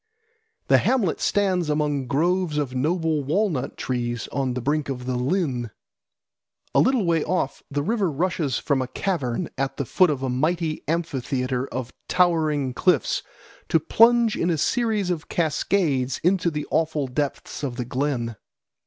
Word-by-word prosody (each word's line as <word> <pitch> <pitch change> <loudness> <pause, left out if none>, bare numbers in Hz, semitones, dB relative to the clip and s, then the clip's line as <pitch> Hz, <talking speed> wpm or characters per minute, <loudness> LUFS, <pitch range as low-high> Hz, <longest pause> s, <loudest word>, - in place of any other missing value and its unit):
The - - +6
hamlet 225 -10 +1
stands 185 -5 +1
among 150 -3 0
groves 170 +3 +1
of 140 -4 -1
noble 155 +2 0
walnut 160 -2 -1
trees 120 -2 -2
on 130 -2 -1
the - - -1
brink 145 +4 -1
of 125 -2 -4
the 125 0 -1
lyn. 125 - -1 1.0
A - - +4
little 255 -5 +3
way 165 -2 +2
off 175 -5 -1
the 145 0 -1
river 210 0 +1
rushes 155 -2 -1
from 140 -3 0
a 130 - -2
cavern 160 -4 -2
at 135 0 -1
the 140 - -2
foot 185 +7 +4
of 135 -3 -2
a - - 0
mighty 155 +5 -1
amphitheatre 135 -5 -1
of 125 -1 -5
towering 155 -7 +2
cliffs 160 - +2 0.5
to 165 - +4
plunge 230 +7 +4
in 170 - 0
a 165 - +1
series 215 - +1
of 165 -3 -4
cascades 155 -5 0
into 180 0 +3
the 150 -2 -4
awful 160 -3 +1
depths 135 +2 -3
of 135 -4 -3
the 125 -1 -3
glen. 125 -3 -2
150 Hz, 155 wpm, -24 LUFS, 130-180 Hz, 1.0 s, The